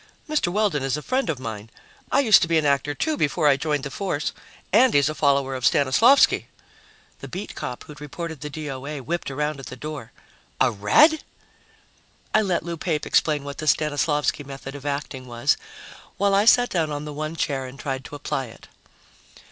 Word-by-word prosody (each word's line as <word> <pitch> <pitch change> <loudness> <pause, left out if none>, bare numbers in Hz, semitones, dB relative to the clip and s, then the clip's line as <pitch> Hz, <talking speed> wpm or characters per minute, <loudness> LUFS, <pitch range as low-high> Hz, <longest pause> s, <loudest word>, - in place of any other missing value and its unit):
"Mr. 305 - 0
Weldon 190 -5 +1
is 135 +1 -1
a 150 - -7
friend 260 +1 0
of 155 - -1
mine 110 -3 -7 0.4
I 280 - +4
used 220 -8 +6
to - - +1
be 165 -1 +2
an 155 - +1
actor, 145 +1 +1
too, 310 -1 -1
before 150 +1 +1
I 140 - +6
joined 150 0 -1
the 140 - -5
force 180 -6 -2 0.4
and 245 - +5
he's 140 +1 +4
a - - -2
follower 140 -3 +1
of 130 -1 -5
Stanislavsky." 145 - +4 0.7
The - - -8
beat 190 +3 -6
cop 125 - -6
who'd 150 -1 -12
reported 160 0 -6
the 150 - -5
D.O.A. 145 -1 -6
whipped 170 +5 -3
around 150 +1 -2
at 135 - -9
the 130 - -7
door. 145 -2 -7 0.5
"A 130 - +4
Red?" 295 - +4 1.1
I 215 - +5
let 185 -5 0
Lou 170 -1 -5
Pape 155 -2 -2
explain 150 -3 +2
what 140 0 -7
the 155 - -4
Stanislavsky 150 -1 +1
method 135 0 -8
of 145 0 -7
acting 140 -2 -4
was, 120 -1 +1 0.6
while 200 0 +2
I 200 +2 +4
sat 245 +1 +5
down 160 -4 0
on 145 0 -4
the 150 - -6
one 155 +2 -4
chair 135 -4 -2
and 130 +2 -12
tried 135 -2 -3
to - - -8
apply 135 -2 -3
it. 110 - -15
150 Hz, 195 wpm, -24 LUFS, 135-170 Hz, 1.1 s, used